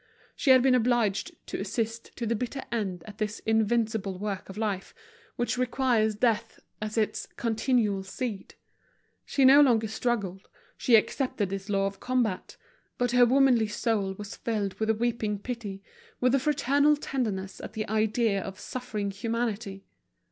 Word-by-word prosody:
She 285 Hz, -, -1 dB
had 260 Hz, -1 st, +7 dB
been 265 Hz, -1 st, +5 dB
obliged 235 Hz, -4 st, +2 dB
to -, -, -5 dB
assist 225 Hz, +3 st, -3 dB
to 235 Hz, -, -3 dB
the 230 Hz, +1 st, 0 dB
bitter 250 Hz, +4 st, -4 dB
end 195 Hz, -7 st, -2 dB
at 210 Hz, 0 st, -11 dB
this 210 Hz, 0 st, -2 dB
invincible 220 Hz, -3 st, +1 dB
work 200 Hz, -1 st, -4 dB
of 195 Hz, -, -9 dB
life 205 Hz, -3 st, -3 dB, 0.4 s
which 240 Hz, +1 st, -1 dB
requires 245 Hz, -4 st, +2 dB
death 220 Hz, 0 st, 0 dB, 0.2 s
as 215 Hz, +1 st, -4 dB
its 215 Hz, -1 st, 0 dB
continual 225 Hz, -3 st, +1 dB
seed. 200 Hz, +1 st, -5 dB, 0.7 s
She 275 Hz, -, +2 dB
no 275 Hz, +3 st, +9 dB
longer 230 Hz, -6 st, +4 dB
struggled, 205 Hz, -4 st, -2 dB, 0.3 s
she 240 Hz, -, +4 dB
accepted 215 Hz, -3 st, +1 dB
this 195 Hz, +1 st, -5 dB
law 195 Hz, -1 st, +2 dB
of 195 Hz, 0 st, -4 dB
combat; 245 Hz, -7 st, -1 dB, 0.4 s
but 245 Hz, -1 st, +1 dB
her 245 Hz, 0 st, +6 dB
womanly 255 Hz, -3 st, +4 dB
soul 210 Hz, -2 st, -1 dB
was 205 Hz, 0 st, -7 dB
filled 210 Hz, -4 st, -2 dB
with 220 Hz, 0 st, 0 dB
a 220 Hz, -, +3 dB
weeping 225 Hz, -2 st, -1 dB
pity, 205 Hz, -3 st, -6 dB, 0.4 s
with 250 Hz, 0 st, +3 dB
a 275 Hz, -, +4 dB
fraternal 285 Hz, +1 st, +3 dB
tenderness 215 Hz, -10 st, -3 dB
at -, -, -8 dB
the 215 Hz, -1 st, -3 dB
idea 215 Hz, -1 st, +1 dB
of 190 Hz, +1 st, -7 dB
suffering 215 Hz, -6 st, -4 dB
humanity. 215 Hz, -2 st, -3 dB
220 Hz, 155 wpm, -28 LUFS, 205-245 Hz, 0.7 s, no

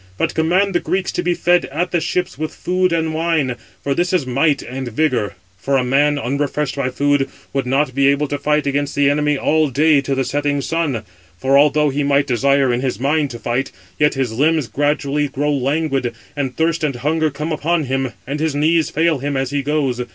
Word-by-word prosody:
But -, -, 0 dB
command 185 Hz, +5 st, +2 dB
the 175 Hz, -, +2 dB
Greeks 190 Hz, +1 st, -1 dB
to -, -, -2 dB
be 175 Hz, 0 st, 0 dB
fed 175 Hz, +1 st, +2 dB
at 170 Hz, +6 st, -3 dB
the 175 Hz, -, +1 dB
ships 180 Hz, +3 st, -2 dB
with 155 Hz, 0 st, -5 dB
food 185 Hz, 0 st, 0 dB
and 160 Hz, -1 st, 0 dB
wine, 160 Hz, -6 st, 0 dB, 0.3 s
for 140 Hz, -, 0 dB
this 175 Hz, +5 st, 0 dB
is 180 Hz, -7 st, +2 dB
might 140 Hz, +3 st, +1 dB
and 130 Hz, +1 st, -6 dB
vigour. 120 Hz, -5 st, 0 dB, 0.2 s
For 135 Hz, +6 st, +1 dB
a 130 Hz, -, +1 dB
man, 145 Hz, +3 st, +2 dB
unrefreshed 140 Hz, +2 st, -2 dB
by 140 Hz, -2 st, -1 dB
food, 140 Hz, +1 st, +1 dB, 0.2 s
would 135 Hz, -2 st, -1 dB
not 135 Hz, +1 st, +1 dB
be 140 Hz, +1 st, +3 dB
able 140 Hz, +1 st, +2 dB
to 145 Hz, -, -2 dB
fight 150 Hz, +1 st, +1 dB
against 140 Hz, 0 st, -1 dB
[the 145 Hz, -1 st, +3 dB
enemy] 150 Hz, 0 st, +1 dB
all 155 Hz, +1 st, +2 dB
day 145 Hz, +2 st, +3 dB
to 135 Hz, 0 st, -2 dB
the 135 Hz, -, 0 dB
setting 145 Hz, +2 st, -1 dB
sun; 145 Hz, -7 st, -1 dB, 0.3 s
for 135 Hz, +7 st, +1 dB
although 150 Hz, +1 st, +4 dB
he 145 Hz, +2 st, -1 dB
might 140 Hz, 0 st, +2 dB
desire 135 Hz, 0 st, +2 dB
in 120 Hz, -, -1 dB
his 130 Hz, -1 st, -2 dB
mind 145 Hz, +2 st, +1 dB
to 120 Hz, -, -7 dB
fight, 120 Hz, +4 st, -2 dB, 0.3 s
yet 150 Hz, 0 st, +3 dB
his 130 Hz, -4 st, -1 dB
limbs 150 Hz, +2 st, +1 dB
gradually 145 Hz, +1 st, 0 dB
grow 145 Hz, +2 st, -1 dB
languid, 135 Hz, -3 st, -1 dB, 0.2 s
and 135 Hz, -3 st, -3 dB
thirst 165 Hz, 0 st, 0 dB
and 145 Hz, -4 st, 0 dB
hunger 155 Hz, +5 st, 0 dB
come 150 Hz, +3 st, -5 dB
upon 160 Hz, +2 st, 0 dB
him, 135 Hz, -1 st, -1 dB
and 140 Hz, +3 st, -4 dB
his 155 Hz, -2 st, -1 dB
knees 160 Hz, +2 st, +2 dB
fail 160 Hz, -2 st, +1 dB
him 140 Hz, +1 st, -2 dB
as 135 Hz, 0 st, -2 dB
he 145 Hz, 0 st, 0 dB
goes. 140 Hz, -4 st, -1 dB
145 Hz, 215 wpm, -19 LUFS, 135-155 Hz, 0.3 s, although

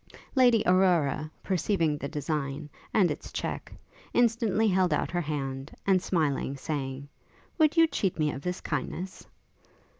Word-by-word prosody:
Lady 245 Hz, -4 st, +5 dB
Aurora, 175 Hz, -5 st, +3 dB
perceiving 175 Hz, -4 st, +1 dB
the 140 Hz, -, -4 dB
design, 145 Hz, -2 st, -3 dB, 0.2 s
and 185 Hz, -6 st, +3 dB
its -, -, -6 dB
check, -, -, -4 dB, 0.4 s
instantly 225 Hz, -3 st, +3 dB
held 185 Hz, -3 st, +3 dB
out 150 Hz, -, 0 dB
her 175 Hz, 0 st, 0 dB
hand, 135 Hz, -3 st, -4 dB, 0.2 s
and 190 Hz, -2 st, +4 dB
smilingly 150 Hz, -6 st, 0 dB
saying, 135 Hz, -1 st, -4 dB, 0.5 s
'Would 310 Hz, +1 st, +4 dB
you 330 Hz, -, +8 dB
cheat 200 Hz, -, -1 dB
me 150 Hz, -2 st, +1 dB
of 135 Hz, -, -6 dB
this 180 Hz, +2 st, -3 dB
kindness?' 170 Hz, +6 st, -4 dB
170 Hz, 140 wpm, -28 LUFS, 145-195 Hz, 0.5 s, you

